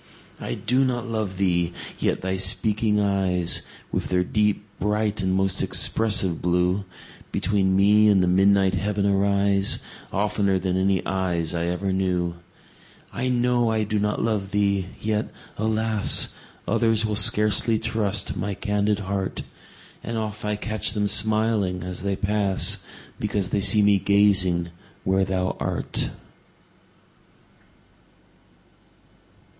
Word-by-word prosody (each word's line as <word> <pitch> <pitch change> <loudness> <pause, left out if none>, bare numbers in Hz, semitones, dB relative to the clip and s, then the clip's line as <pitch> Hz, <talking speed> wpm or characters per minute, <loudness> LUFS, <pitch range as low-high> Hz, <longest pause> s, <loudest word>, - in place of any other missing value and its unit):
I - - -4
do 125 +4 +1
not 125 -2 -1
love 110 -5 -3
thee!—yet 85 -3 -1
thy 95 0 -2
speaking 105 +2 +1
eyes, 95 -4 +1 0.3
With - - -2
their 90 0 +1
deep, 105 +1 0
bright, 105 0 -1
and 95 0 0
most 95 -1 +1
expressive 100 -6 +2
blue, 90 +3 0 0.5
Between 95 -2 0
me 105 +2 +4
and 100 -3 +4
the - - +1
midnight 95 +1 +3
heaven 100 +1 -1
arise, 100 0 +2 0.3
15 - - -24
Oftener 100 -2 +1
than 95 -1 -2
any 95 0 +1
eyes 90 -3 -1
I 85 0 -2
ever 95 +2 -2
knew. 90 -2 -1 0.8
I 125 +2 -2
know 125 -1 +1
I 110 -1 0
do 105 0 -1
not 105 0 -1
love 105 -4 -1
thee! 100 -2 0
yet, 105 0 -2 0.3
alas! 110 0 +2 0.3
Others 115 -1 +2
will 105 -1 -1
scarcely 105 +2 +3
trust 105 -4 -1
my 100 +2 -3
candid 105 0 -1
heart; 95 -1 -3 0.6
And 115 0 -4
oft 110 -1 -5
I 105 0 -1
catch 105 -1 -3
them 105 -1 0
smiling 105 -3 +1
as 90 -1 -5
they 100 0 -1
pass, 100 -1 +1 0.4
Because 105 -3 -2
they 100 - 0
see 105 +2 +4
me 100 -1 +4
gazing 95 -4 +2 0.3
where 95 0 +1
thou 95 0 -2
art. - - -2
100 Hz, 130 wpm, -23 LUFS, 95-105 Hz, 0.8 s, me